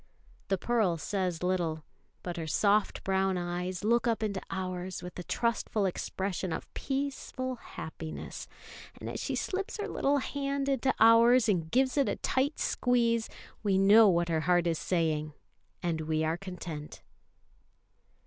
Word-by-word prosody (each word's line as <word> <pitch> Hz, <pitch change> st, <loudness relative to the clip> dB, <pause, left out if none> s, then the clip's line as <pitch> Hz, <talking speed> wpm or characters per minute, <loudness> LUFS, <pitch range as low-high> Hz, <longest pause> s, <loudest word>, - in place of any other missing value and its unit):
The 195 Hz, -, +1 dB
Pearl 215 Hz, -5 st, +1 dB
says 180 Hz, -1 st, -2 dB
little; 170 Hz, -4 st, 0 dB, 0.4 s
but 175 Hz, -1 st, -4 dB
her 165 Hz, -1 st, -4 dB
soft 205 Hz, +6 st, +2 dB
brown 190 Hz, -1 st, +1 dB
eyes 180 Hz, +1 st, -3 dB
look 235 Hz, +3 st, +2 dB
up 225 Hz, -1 st, +1 dB
into 200 Hz, -3 st, -2 dB
ours 185 Hz, -1 st, -4 dB
with 180 Hz, 0 st, -7 dB
a -, -, -5 dB
trustful 225 Hz, -1 st, 0 dB
expression 190 Hz, 0 st, -2 dB
of 160 Hz, -, -5 dB
peaceful 265 Hz, -2 st, -3 dB
happiness; 160 Hz, -6 st, -7 dB, 0.5 s
and -, -, -7 dB
as -, -, -4 dB
she -, -, -2 dB
slips 390 Hz, +3 st, -3 dB
her 415 Hz, -, -3 dB
little 285 Hz, +1 st, +1 dB
hand 280 Hz, 0 st, -2 dB
into 270 Hz, -1 st, +2 dB
ours 230 Hz, +2 st, +6 dB
and 170 Hz, -6 st, +1 dB
gives 260 Hz, -, +2 dB
it 280 Hz, -, +3 dB
a -, -, 0 dB
tight 275 Hz, +3 st, 0 dB
squeeze, 235 Hz, -2 st, +1 dB, 0.3 s
we 200 Hz, -3 st, +2 dB
know 205 Hz, +3 st, +7 dB
what 170 Hz, -1 st, +2 dB
her 160 Hz, -1 st, +1 dB
heart 175 Hz, -1 st, +4 dB
is 165 Hz, -2 st, 0 dB
saying, 155 Hz, -4 st, 0 dB, 0.5 s
and 165 Hz, -2 st, -1 dB
we 155 Hz, 0 st, 0 dB
are 160 Hz, +1 st, +1 dB
content. 175 Hz, -5 st, -7 dB
190 Hz, 150 wpm, -30 LUFS, 175-235 Hz, 0.5 s, know